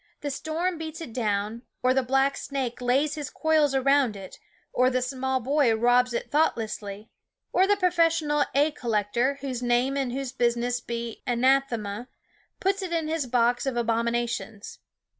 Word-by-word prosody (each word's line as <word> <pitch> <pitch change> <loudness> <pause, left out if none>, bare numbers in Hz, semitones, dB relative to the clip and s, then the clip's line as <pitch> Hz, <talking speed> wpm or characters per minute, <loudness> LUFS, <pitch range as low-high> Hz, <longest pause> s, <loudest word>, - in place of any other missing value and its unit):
The 285 - -3
storm 325 +5 -2
beats 315 0 -6
it 285 -9 -8
down; 215 -1 -1 0.2
or 255 0 +4
the 265 - +3
black 270 +2 +2
snake 260 -4 -4
lays 270 +5 +2
his 295 -3 -5
coils 310 -3 +2
around 270 -3 +3
it; 195 -2 -10 0.3
or 255 +1 +4
the 255 0 +1
small 260 +1 -1
boy 265 -2 +2
robs 245 +2 +3
it 235 - -4
thoughtlessly; 215 -8 -1 0.4
or 380 +1 +4
the 410 0 +3
professional 330 -5 +2
egg 295 +2 +3
col 240 - -5
lector, 230 +6 +1
whose 260 -3 -4
name 245 +2 +1
and 265 -3 -1
whose 265 0 -3
business 240 -1 0
be 235 -1 -5
anathema, 245 -3 +1 0.5
puts 390 +1 0
it 370 -2 -4
into 320 -2 -1
his 310 -5 -1
box 245 +1 +2
of 265 - -1
abomina 235 0 0
tions. 220 -2 -6
255 Hz, 165 wpm, -26 LUFS, 235-290 Hz, 0.5 s, or